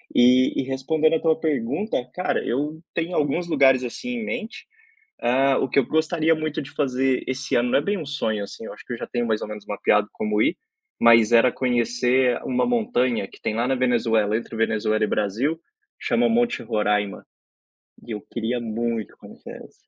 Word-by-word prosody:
E 125 +2 +4
e - - -3
respondendo 155 +4 +1
a - - +1
tua 160 -1 +2
pergunta, 150 - -1 0.2
cara, 180 - -1
eu 150 +6 -2
tenho 170 +2 -2
alguns 155 +4 0
lugares 135 -4 +4
assim 185 - -6
em 220 - -4
mente, 235 -2 -5 0.6
ah, 135 +2 +3
o 135 - -1
que 140 - +3
eu 130 - +1
gostaria 160 +1 +1
muito 155 0 -3
de 145 +1 -10
fazer 135 -2 0
esse 130 +1 -2
ano 120 +1 +2
não - - +4
é - - -2
bem 200 +6 -1
um 160 - -5
sonho 110 -8 -2
assim, 110 +3 -9
eu - - -7
acho - - -14
que 125 - -6
eu - - -4
já - - -5
tenho 120 -1 -2
mais 110 -1 0
ou - - -4
menos 105 -1 -8
mapeado 105 0 +1
de - - -39
como 105 0 -1
ir, 175 - +2 0.4
mas 115 -1 +6
era 120 +2 +5
conhecer 125 0 +1
uma 125 -1 0
montanha 130 - 0
que - - -17
tem 110 - -2
lá 120 +2 0
na 135 - +1
Venezuela, 115 -4 +1
entre 115 0 -7
Venezuela 110 -1 +1
e - - +2
Brasil, 125 +11 -1 0.4
chama 240 0 +1
Monte 235 +1 +1
Roraima. 105 -2 -1 0.8
E - - -10
eu 105 - -5
queria 120 +1 -2
muito 115 -1 -3
conhecer - - -11
essa. - - -17
125 Hz, 200 wpm, -23 LUFS, 115-155 Hz, 0.8 s, mas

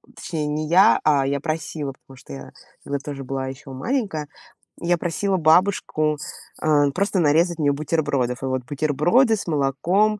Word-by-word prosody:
точнее 155 -4 -4
не 150 +1 -2
я, 185 +4 +6
а, 140 -3 +3
я 140 0 0
просила, 155 -2 -3
потому 135 0 -18
что 100 - -14
я 70 0 -9 0.3
тогда 140 0 -2
тоже 140 -1 -7
была 135 0 -3
еще 135 +1 -9
маленькая, 160 - -2 0.5
я 175 0 +1
просила 190 +4 -1
бабушку, 155 -2 +2 0.4
а, 145 -2 +3
просто 195 +3 0
нарезать 165 +2 +2
мне 145 -2 +3
бутербродов. 140 -5 -1
И - - -1
вот 130 -1 -2
бутерброды 155 - +2
с 195 - -7
молоком, 170 +9 +1
150 Hz, 160 wpm, -22 LUFS, 140-175 Hz, 0.5 s, я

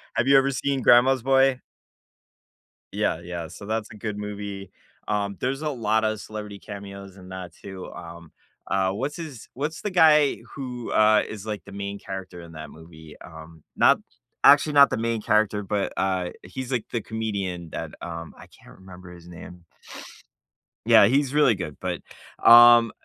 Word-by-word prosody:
Have 120 - 0
you 140 0 +6
ever 135 0 +3
seen 135 0 -2
Grandma's 125 +1 +5
Boy? 135 0 +3 1.3
Yeah, - - -1
yeah, 85 -1 -6
so 100 - -11
that's 110 +1 -3
a - - -11
good 105 0 -5
movie, 100 -2 -7 0.4
um, 100 -2 -2
there's 135 +3 -2
a 155 - -2
lotta 110 -4 0
celebrity 105 -1 -8
cameos 100 -1 -10
in 90 -1 -13
that 95 -3 -8
too, 95 0 -10
um, 85 -1 -11 0.4
uh, 95 -1 0
what's 130 +9 -4
his 155 -9 -9
what's 150 +5 -4
the 210 - -3
guy 155 -6 +4 0.2
who, 125 -3 -6
uh, 110 0 +4
is, 105 -1 -8
like, 105 -2 -5
the 100 - -12
main 100 0 -5
character 95 -3 -8
in 85 -1 -12
that 80 -1 -9
movie, 80 -1 -14
um, 80 0 -13
not - - +4 0.4
actually, 150 - +6
not 140 -1 +7
the - - -2
main 115 0 -2
character, 105 -1 +1
but, 100 0 -2
uh, 95 -2 -1
he's, 125 +8 -7
like, 125 -4 -1
the 115 - -2
comedian 100 -6 -4
that, - - -6
um 85 -1 -7
I - - -14
can't - - -18
remember 90 -1 -13
his 85 -1 -14
name. 90 0 -12 1.2
Yeah, - - +7
he's 135 +2 +1
really 145 -6 +4
good, 90 -6 -7
but, - - -4 0.4
um, 120 -1 +8
105 Hz, 170 wpm, -24 LUFS, 95-125 Hz, 1.3 s, um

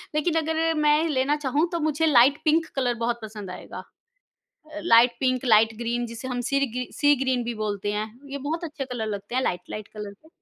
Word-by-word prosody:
लेकिन 310 +2 +1
अगर 320 +1 0
मैं 300 +2 +3
लेना 270 +1 +1
चाहूँ, 295 +2 0
तो 340 - -1
मुझे 310 0 +1
लाइट 280 +1 +5
पिंक 320 +1 +3
कलर 250 -3 +1
बहुत 235 0 -1
पसंद 210 -3 -8
आएगा। - - -8 0.9
अ, 310 - -5
लाइट 235 -4 +5
पिंक, 255 -1 +1
लाइट 225 -2 +4
ग्रीन 240 0 -2
जिसे 230 +3 -7
हम 245 -1 -2
सीर् 275 0 +2
गी 250 0 -4
सी 290 0 +5
ग्रीन 255 -2 0
भी 235 0 -3
बोलते 205 -1 -2
हैं, 210 +1 -3 0.2
ये 280 - -4
बहुत 330 +3 -2
अच्छे 300 -4 -5
कलर 245 -4 -4
लगते 205 +2 -5
हैं 260 - +2
लाइट 180 -8 -1
लाइट 215 -1 -6
कलर 210 -1 -6
के। 310 +10 -21
255 Hz, 215 wpm, -25 LUFS, 225-300 Hz, 0.9 s, लाइट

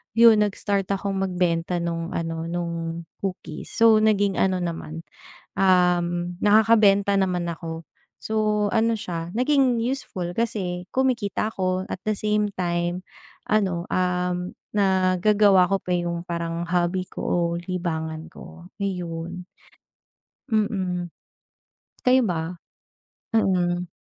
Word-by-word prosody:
yun, 230 -2 +7
nag-start 200 -1 -1
akong 195 0 -1
magbenta 180 -2 0
nung 170 0 -3
ano, 165 0 -3
nung 170 -1 -3 0.2
cookies. 180 -5 -5
So, 225 -1 +6
naging 205 -2 +2
ano 185 -1 +2
naman, 165 -1 -5 0.6
um, 180 -2 +2
nakakabenta 205 -2 +5
naman 180 -2 0
ako. 165 0 -6 0.4
So, 215 -1 +1
ano 230 +1 +2
siya, 170 -4 -5
naging 255 -1 +2
useful, 230 -8 -3
kasi 190 -6 -2
kumikita 235 -5 0
ako, 185 -1 -1
at - - -3
the 215 - +2
same 210 0 +1
time 175 0 -1 0.5
ano, 190 -5 +1
um, 180 0 -1 0.2
nagagawa 190 0 +4
ko 195 - +3
pa - - -7
yung 170 -1 -2
parang 170 0 -3
hobby 180 +1 +1
ko - - -7
o - - 0 0.2
libangan 165 -3 -4
ko, 170 +1 -13
ayun. 180 -2 -4 1.1
Mm. 190 -5 0 1.0
Kayo 255 +1 +5
ba? 170 -1 -3 0.8
Mm. 180 -4 +1
185 Hz, 110 wpm, -24 LUFS, 175-210 Hz, 1.1 s, yun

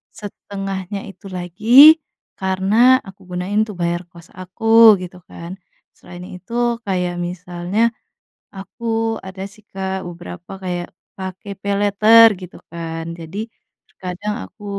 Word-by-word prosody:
setengahnya 195 -1 -6
itu 195 - -15
lagi, 225 - +6 0.4
karena 195 +7 +4
aku 195 0 -13 0.2
gunain 195 +4 -1
tuh 210 - -8
bayar 175 0 -1
kos 170 0 -15
aku 225 +4 +5
gitu 180 0 -9
kan, 170 +1 -9 0.5
selain 180 0 -11
itu 185 +5 -11 0.3
kayak 180 -3 -1
misalnya, 180 +6 -1 0.6
aku 225 +3 -3
ada 190 0 -8
sih 200 +2 -17
Kak 190 0 -4
beberapa 175 +2 -9
kayak 175 -1 -3 0.3
pakai 190 +1 -7
paylater 205 +3 +6
gitu 180 -1 -10
kan 165 -1 -5
jadi, 165 +4 -8 0.5
terkadang 185 +3 -5
aku 210 - -15
190 Hz, 120 wpm, -19 LUFS, 180-210 Hz, 0.6 s, lagi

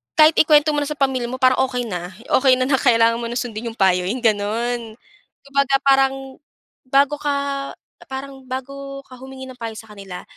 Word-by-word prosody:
kahit 310 0 +6
ikuwento 300 -1 +5
mo - - +1
na 290 - -1
sa - - -2
pamilya 265 -3 0
mo, 255 +1 -6
parang 255 0 +4
okey 250 -2 -3
na, 180 0 -5 0.2
okey 260 -1 +4
na, 255 - +1
na 270 - +3
kailangan 230 -3 +3
mo - - -4
ng - - -4
sundin 230 -2 -5
yung - - -9
payo, 180 -2 +3
yung 245 +4 -3
gano'n. 225 +2 -1 0.5
Kumbaga 280 -1 +1
parang 270 -1 +2 0.5
bago 275 +2 +3
ka 290 0 -1 0.8
parang 265 0 -8
bago 275 +2 -7
ka 255 - -12
humingi 265 +1 -10
ng 255 - -11
payo 230 -1 -5
sa 225 - -11
kanila, 195 -3 -9
260 Hz, 190 wpm, -20 LUFS, 230-275 Hz, 0.8 s, kahit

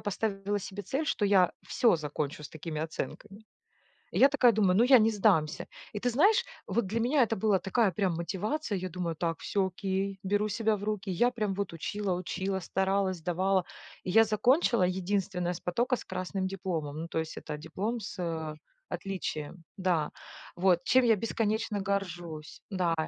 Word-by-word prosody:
поставила 205 0 -1
себе 195 +2 -6
цель, 275 - -2
что 210 - 0
я 190 -3 +5 0.2
всё 180 +2 +3
закончу 150 0 -4
с - - -6
такими 160 -1 -5
оценками. 195 +7 -6 0.7
Я 275 - +6
такая 255 -4 +5
думаю: 195 -3 +3
"Ну, 235 - +6
я 260 -1 +8
не 220 +1 +4
сдамся". 185 -7 +2 0.3
И 210 - -3
ты 245 +2 +1
знаешь, 395 - +4 0.2
вот 235 -4 0
для 225 +4 -1
меня 255 +4 +3
это 225 -1 +2
было 200 -1 +3
такая 200 +2 +2
прям 185 -1 0
мотивация, 205 - -2
я 185 +1 -4
думаю: 170 -2 -3
"Так, 165 0 -2
всё 195 -2 0
окей, 195 +1 -2
беру 205 +2 +1
себя 220 +1 +1
в 205 - -7
руки". 210 -2 -2
Я 240 +8 +3
прям 210 -5 -1
вот 200 -3 -3
учила 195 +3 -2
учила, 190 +2 -2
старалась, 190 +1 0
сдавала. 185 +2 +1 0.4
Я 220 +5 +5
закончила 235 - +3
единственная 185 -1 -1
с - - -7
потока 240 +8 0
с - - -9
красным 185 +1 -3
дипломом, 170 -6 -3
ну 165 - -5
то 160 - -2
есть 160 0 -3
это 150 - -6
диплом 200 +10 -3
с, 195 - -7
э, 160 -2 -3 0.3
отличием. 170 -4 -5
Да, 180 -5 0 0.4
вот 180 -1 +3
чем 260 -1 +4
я 225 -2 +5
бесконечно 220 -1 -1
горжусь. 175 -6 -4
Да. 180 -3 +1
195 Hz, 175 wpm, -30 LUFS, 175-215 Hz, 0.7 s, я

